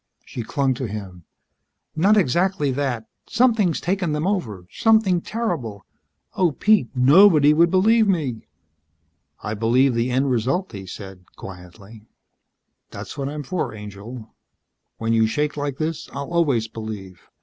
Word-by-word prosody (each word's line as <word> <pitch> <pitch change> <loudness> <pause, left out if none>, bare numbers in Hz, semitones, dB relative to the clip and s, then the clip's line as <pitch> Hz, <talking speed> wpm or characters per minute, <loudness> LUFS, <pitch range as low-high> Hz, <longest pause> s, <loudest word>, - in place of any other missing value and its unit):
She 120 - -6
clung 135 +3 0
to 125 0 -4
him. 95 -5 -8 0.7
"Not 195 +7 +4
exactly 175 -2 +1
that. 130 -4 -2 0.2
Something's 225 -8 +2
taken 180 -3 -1
them 150 +2 -1
over. 115 - -2
Something 220 -6 +3
terrible. 160 - -4 0.5
Oh, 175 -5 +1
Pete! 210 - +2
Nobody 150 +3 +6
would 170 +2 +4
believe 215 +5 +3
me." 145 - -1 1.0
"I 105 - -3
believe 120 +5 +2
the 115 +2 0
end 130 +2 +1
result," 130 - -1
he 95 -3 -9
said, 95 -1 -10
quietly. 95 +4 -12 0.8
"That's - - -8
what 140 -1 -3
I'm 150 0 -5
for, 155 -4 -3
angel. 105 +3 -10 0.6
When 115 0 -1
you 110 -1 +3
shake 150 +6 -1
like 145 -2 -3
this 160 +1 -4
I'll 140 +3 -6
always 140 -10 +1
believe. 110 -5 -9
135 Hz, 140 wpm, -22 LUFS, 110-175 Hz, 1.0 s, Nobody